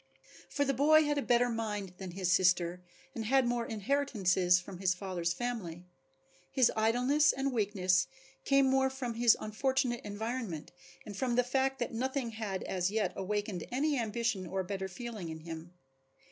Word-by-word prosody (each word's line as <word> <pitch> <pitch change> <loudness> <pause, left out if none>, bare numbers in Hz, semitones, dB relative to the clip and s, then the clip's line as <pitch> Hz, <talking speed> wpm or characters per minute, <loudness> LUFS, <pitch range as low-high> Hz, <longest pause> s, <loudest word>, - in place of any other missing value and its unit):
For 285 - 0
the 275 - +1
boy 310 +4 +5
had 295 -1 0
a - - -1
better 245 -1 +3
mind 210 -5 -3
than 190 -1 -6
his 180 0 -1
sister 180 -1 +3 0.3
and 225 - -4
had 265 +3 +3
more 240 -1 -1
inheritances 205 -7 +2
from 180 0 -10
his 185 -1 +2
father's 180 -3 -2
family. 180 -5 -4 0.6
His 255 -3 +3
idleness 250 +7 +3
and 270 0 -2
weakness 195 -5 +2 0.4
came 275 0 +4
more 265 0 +3
from 260 -3 -4
his 235 0 +5
unfortunate 250 +2 0
environment 210 -5 -4 0.3
and 205 - -8
from 245 +3 -1
the 250 - +4
fact 265 +2 0
that 240 - -3
nothing 260 +1 -2
had 215 -4 -4
as 180 -1 -1
yet 215 +1 0
awakened 205 -2 -2
any 290 +4 +1
ambition 220 -4 -1
or 190 +2 -2
better 190 +1 -4
feeling 210 -2 -7
in 160 0 -7
him. 165 +1 -8
220 Hz, 165 wpm, -32 LUFS, 185-255 Hz, 0.6 s, boy